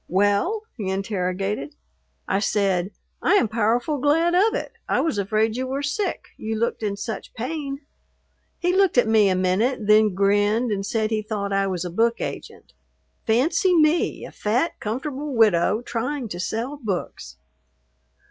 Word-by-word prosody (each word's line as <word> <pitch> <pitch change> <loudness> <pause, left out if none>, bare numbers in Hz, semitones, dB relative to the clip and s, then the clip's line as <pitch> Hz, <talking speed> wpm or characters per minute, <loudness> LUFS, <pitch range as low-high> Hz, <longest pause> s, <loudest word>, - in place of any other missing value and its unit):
"Well?" 205 - +1
he 200 -5 -3
interrogated. 190 -4 -2 0.5
I 195 - +1
said, 195 -3 +1 0.3
"I - - +3
am 320 - +4
powerful 235 +6 0
glad 325 +5 +2
of 425 +6 +3
it. - - -4 0.2
I - - +2
was 315 -11 0
afraid 215 +2 +1
you 260 +1 -2
were 275 +2 -3
sick, 305 +8 -2
you 220 0 -3
looked 230 +1 -1
in 205 -2 -2
such 220 +2 -6
pain." 275 +3 -4 0.8
He 355 0 0
looked 385 -7 +3
at 245 - +5
me 220 -3 +4
a 185 - +2
minute, 205 +6 +1
then 210 -2 +4
grinned 205 +4 +2
and 195 -1 -1
said 215 +2 -1
he 215 -1 0
thought 205 -2 -3
I 195 0 +2
was 185 -2 -3
a 175 - -4
book 230 +5 +1
agent. - - -7 0.5
Fancy 330 - +3
me, 310 +2 +2
a - - -10
fat, 245 +10 -1
comfortable 270 +5 -4
widow, 215 0 +3
trying 250 +3 -3
to 175 - -6
sell 230 +9 -3
books! 180 - -5
220 Hz, 160 wpm, -23 LUFS, 200-275 Hz, 0.8 s, at